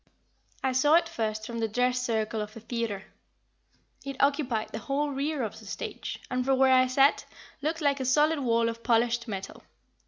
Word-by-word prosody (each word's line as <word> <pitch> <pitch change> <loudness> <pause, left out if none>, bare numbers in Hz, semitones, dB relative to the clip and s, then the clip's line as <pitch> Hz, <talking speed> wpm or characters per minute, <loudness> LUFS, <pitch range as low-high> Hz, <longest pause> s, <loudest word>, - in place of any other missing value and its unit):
I 265 - +2
saw 290 +5 +4
it 335 0 +4
first 215 -5 -3
from 235 0 -5
the 225 - +1
dress 250 +3 +1
circle 220 -2 -1
of 210 +1 -7
a - - -7
theater. 225 -3 -3 1.0
It 275 0 -5
occupied 275 -6 +1
the - - -4
whole 290 +1 -1
rear 280 0 -1
of 220 0 -5
the 215 - -13
stage, - - -5
and 255 0 0
from 265 +1 +2
where 265 0 +5
I 255 0 +5
sat, 270 +3 +3 0.4
looked 320 +3 -2
like 285 -2 +2
a 260 - -2
solid 300 +4 +3
wall 230 -3 +2
of 230 0 -4
polished 235 0 +1
metal. 195 -2 -6
250 Hz, 190 wpm, -28 LUFS, 225-275 Hz, 1.0 s, where